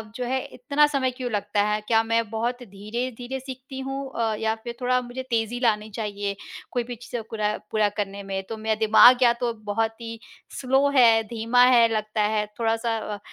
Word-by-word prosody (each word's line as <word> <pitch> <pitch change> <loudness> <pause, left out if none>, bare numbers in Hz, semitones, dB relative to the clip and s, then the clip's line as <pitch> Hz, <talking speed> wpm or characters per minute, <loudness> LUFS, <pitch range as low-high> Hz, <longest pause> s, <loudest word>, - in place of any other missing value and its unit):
जो 250 - -3
है 260 +2 0
इतना 285 +4 +1
समय 270 -3 0
क्यों 250 -1 -5
लगता 205 0 0
है? 210 0 0
क्या 225 -1 +4
मैं 230 -1 0
बहुत 240 +3 -2
धीरे-धीरे 240 +5 -5
सीखती 265 0 -9
हूँ 270 0 -4
अ, 225 -2 0
या 220 0 0
फिर 235 -1 -6
थोड़ा 250 0 +2
मुझे 250 +1 -7
तेज़ी 230 0 -1
लानी 220 -3 +1
चाहिए 205 -2 -3 0.4
कोई 245 - -1
भी 245 +1 -7
चीज़ें 240 0 -6
कूरा 215 -1 -2 0.2
पूरा 215 -1 +2
करने 200 -1 -3
में? 195 0 -4
तो 225 - -5
मेरा 220 0 -1
दिमाग 245 +4 +7
या 240 -1 +6
तो 235 -1 0
बहुत 225 +1 -3
ही 230 -1 -7 0.4
स्लो 270 +2 +3
है, 230 -3 +6
धीमा 235 +2 +2
है 240 -2 +6
लगता 215 0 -1
है 210 0 +1
थोड़ा-सा 225 0 0 0.2
अ, - - -11
230 Hz, 195 wpm, -24 LUFS, 215-250 Hz, 0.4 s, दिमाग